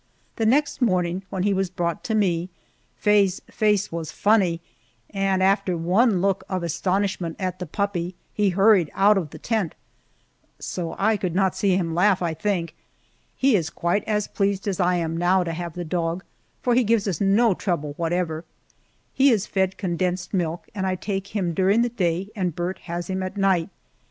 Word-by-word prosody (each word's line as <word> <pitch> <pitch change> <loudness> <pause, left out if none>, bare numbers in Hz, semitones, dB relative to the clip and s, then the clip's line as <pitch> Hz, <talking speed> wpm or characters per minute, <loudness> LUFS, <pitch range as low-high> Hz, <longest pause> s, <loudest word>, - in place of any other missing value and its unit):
The 225 - +1
next 285 +4 +2
morning, 180 -5 +1
when 185 -1 -2
he 200 0 +2
was 190 -1 0
brought 175 +1 -2
to 220 -3 0
me, 180 -4 +1 0.5
Faye's 200 -3 +3
face 210 -2 +1
was 165 -2 -4
funny, 195 -6 +2 0.5
and 195 -1 +1
after 195 -2 +2
one 185 +4 +2
look 195 -1 +1
of 185 -2 -2
astonishment 185 0 -1
at 185 -1 -3
the 180 - -5
puppy 185 -1 -2 0.2
he 205 -2 +2
hurried 195 -3 +4
out 205 +2 +5
of 180 -6 -1
the - - -10
tent 220 -8 -2 0.8
so 170 -3 -4
I 215 +2 +2
could 180 -4 -3
not 190 -1 +2
see 190 -3 +2
him 165 -3 -1
laugh, 185 +2 +3
I 170 -2 -1
think. 185 -2 -2 0.6
He 265 -3 +3
is 170 -4 0
quite 175 +5 -1
as 210 -2 0
pleased 200 0 -1
as 195 -2 -1
I 180 0 +3
am, 165 -2 -1
now, 180 +2 +3
to 165 -1 -3
have 170 0 -5
the 175 -1 -4
dog, 170 +2 -2 0.4
for 245 - +2
he 250 +1 +4
gives 205 -6 +1
no 205 +3 +4
trouble 160 -6 -2
whatever. 165 -1 -1 0.7
He 275 +1 +5
is 215 -5 +2
fed 190 -1 -1
condensed 180 0 -2
milk, 170 -3 -2
and 190 -3 -2
I 185 - 0
take 195 +1 -3
care 200 0 -3
of 175 - 0
him - - -3
during 195 +6 +3
the 240 - 0
day 185 -4 -1
and 180 -6 -2
Burt 175 +2 -3
has 175 0 -3
him 190 -1 -2
at 185 +2 -5
night. 190 -4 +2
190 Hz, 190 wpm, -24 LUFS, 175-205 Hz, 0.8 s, out